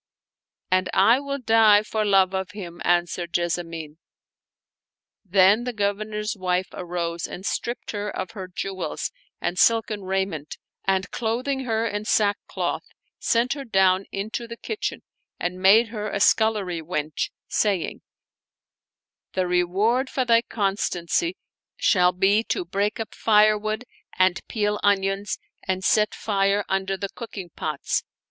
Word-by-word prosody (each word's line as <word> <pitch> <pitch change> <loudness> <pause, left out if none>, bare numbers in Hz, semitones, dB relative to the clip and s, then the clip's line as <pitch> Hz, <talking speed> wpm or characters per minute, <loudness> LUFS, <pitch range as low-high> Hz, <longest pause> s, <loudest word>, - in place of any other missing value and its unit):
" - - -56
And 185 0 +2
I 230 +7 +6
will 280 0 -3
die 225 -4 +5
for 215 0 -1
love 195 -2 +4
of 190 -3 -3
him," 175 -4 -8
answered 175 0 +1
Jessamine. 165 -3 -2 1.2
Then 195 +3 +4
the 250 0 -3
Governor's 210 0 -2
wife 185 -1 -1
arose 170 -1 -3
and 190 - -8
stripped 240 +2 -3
her 205 -1 -3
of 185 -2 -5
her 190 -4 -7
jewels 190 +1 -4 0.3
and 180 - -2
silken 225 -2 +3
raiment 190 -5 -2 0.3
and, 195 0 0
clothing 255 +4 -1
her 225 -1 0
in 205 -1 -3
sackcloth, 205 -1 0 0.4
sent 235 +3 +2
her 280 -1 -6
down 190 -4 +3
into 220 +4 -4
the 230 0 -8
kitchen 425 - -4 0.4
and 180 +1 -3
made 220 +5 +6
her 210 -2 -4
a 200 - -2
scullery 205 -5 +2
wench, 155 -2 -2 0.2
saying, 200 -6 0 0.7
" - - -67
The 185 -1 +1
reward 195 +9 +1
for 260 - 0
thy 230 -1 +5
constancy 205 - -1 0.4
shall 180 -2 +4
be 195 +4 +3
to - - -2
break 200 +5 -1
up 225 - -5
firewood 215 +1 +3 0.3
and 185 0 +3
peel 210 -2 0
onions 195 0 +1 0.2
and 190 0 -2
set 210 +2 +3
fire 200 -1 +1
under 195 0 -1
the 200 0 -4
cooking 195 -7 -8
pots." 150 -2 -2
200 Hz, 140 wpm, -24 LUFS, 185-220 Hz, 1.2 s, I